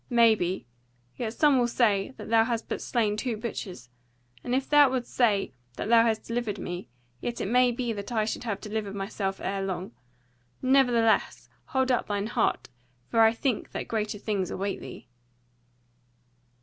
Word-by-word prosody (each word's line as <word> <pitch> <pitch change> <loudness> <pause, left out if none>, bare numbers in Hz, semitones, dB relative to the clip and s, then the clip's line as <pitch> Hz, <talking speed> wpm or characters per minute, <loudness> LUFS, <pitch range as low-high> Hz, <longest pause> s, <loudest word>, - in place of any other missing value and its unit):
Maybe. 220 - +3 0.5
Yet 225 -3 -3
some 290 -4 +4
will 240 - +3
say 230 -1 +1
that - - -8
thou 225 -1 +6
hast 230 -1 -2
but - - -3
slain 220 -4 0
two 230 +1 -2
butchers: 185 - -6 0.5
and 245 - -1
if 270 +1 0
thou 290 -2 +6
wilt 255 -2 -1
say 210 - +1 0.2
that - - -4
thou 230 -1 +7
hast 225 -1 0
delivered 230 -3 -2
me; 175 -6 -6 0.3
yet 235 - -4
it - - -2
may 250 +4 +4
be 240 -1 -2
that 200 +2 -6
I 220 -2 +1
should 220 - -3
have 210 -4 -3
delivered 210 -2 -4
myself 195 -1 -3
ere 195 0 -2
long. 190 -1 -3 0.7
Nevertheless 245 -4 +2 0.2
hold 260 -1 +1
up 245 - +1
thine 205 -1 -1
heart, 220 - 0 0.4
for 230 - +2
I 225 0 +7
think 230 0 -2
that - - -4
greater 215 -2 -2
things 200 -3 -2
await 195 +1 -3
thee." - - -10
225 Hz, 170 wpm, -27 LUFS, 200-240 Hz, 0.7 s, thou